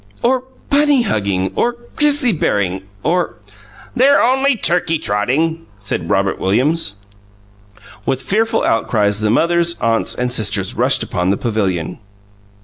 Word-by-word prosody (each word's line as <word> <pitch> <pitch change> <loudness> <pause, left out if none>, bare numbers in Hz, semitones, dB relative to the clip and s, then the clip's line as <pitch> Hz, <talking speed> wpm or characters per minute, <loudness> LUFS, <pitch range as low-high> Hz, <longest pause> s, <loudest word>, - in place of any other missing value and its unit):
"Or 255 +1 +1 0.3
Bunny 285 -2 +4
Hugging 100 - -1
or 240 0 0 0.2
Grizzly 290 -5 +2
Bearing, 95 - -1 0.2
or 175 +1 0 0.3
" 105 - -22
"They're 270 +3 +5
only 265 +1 +2
Turkey 170 -4 +1
Trotting," 145 +10 -1
said 100 -1 -4
Robert - - +1
Williams. 120 - +1 1.1
With 130 0 -1
fearful 220 - 0
outcries 105 -2 +1
the 105 - +1
mothers, 170 +7 +2
aunts, 115 -1 0
and 125 0 -1
sisters 110 -4 0
rushed - - +1
upon 90 +1 -2
the 100 - +1
pavilion. 95 -8 -2
145 Hz, 130 wpm, -17 LUFS, -, 1.1 s, They're